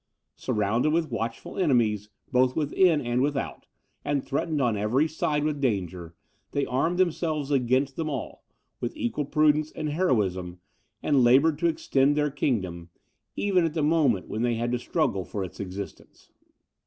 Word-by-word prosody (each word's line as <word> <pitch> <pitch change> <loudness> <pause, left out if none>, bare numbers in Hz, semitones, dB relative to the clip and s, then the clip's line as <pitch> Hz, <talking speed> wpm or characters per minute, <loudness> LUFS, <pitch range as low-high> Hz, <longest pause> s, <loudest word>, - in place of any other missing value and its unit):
Surrounded 110 +6 0
with 160 -3 0
watchful 115 - -4
enemies, 115 - +2 0.2
both 130 0 +3
within 160 +2 +3
and 120 +1 0
without, 140 0 -2 0.4
and 145 -2 0
threatened 150 +2 -1
on 120 -5 +2
every 115 +9 +1
side 150 -1 -1
with 150 -2 -1
danger, 90 - -2 0.4
they 140 -1 +1
armed 165 +8 0
themselves 160 -5 0
against 130 +1 +1
them 160 -1 -2
all, 135 -6 -5 0.4
with - - -4
equal 120 +5 -2
prudence 150 +1 +2
and 155 - -3
heroism, 95 - 0 0.4
and 140 -4 +3
laboured 140 +5 +4
to 170 - +2
extend 145 -3 +2
their 150 -1 +1
kingdom, 95 - -2 0.5
even 190 -3 +2
at 165 -1 -1
the 155 - +1
moment 145 - +2
when 110 - -3
they 120 -1 +1
had 120 +1 -1
to 125 - 0
struggle 125 - 0
for 100 +2 -4
its 90 - -9
existence. 100 0 -8
135 Hz, 155 wpm, -26 LUFS, 110-155 Hz, 0.5 s, laboured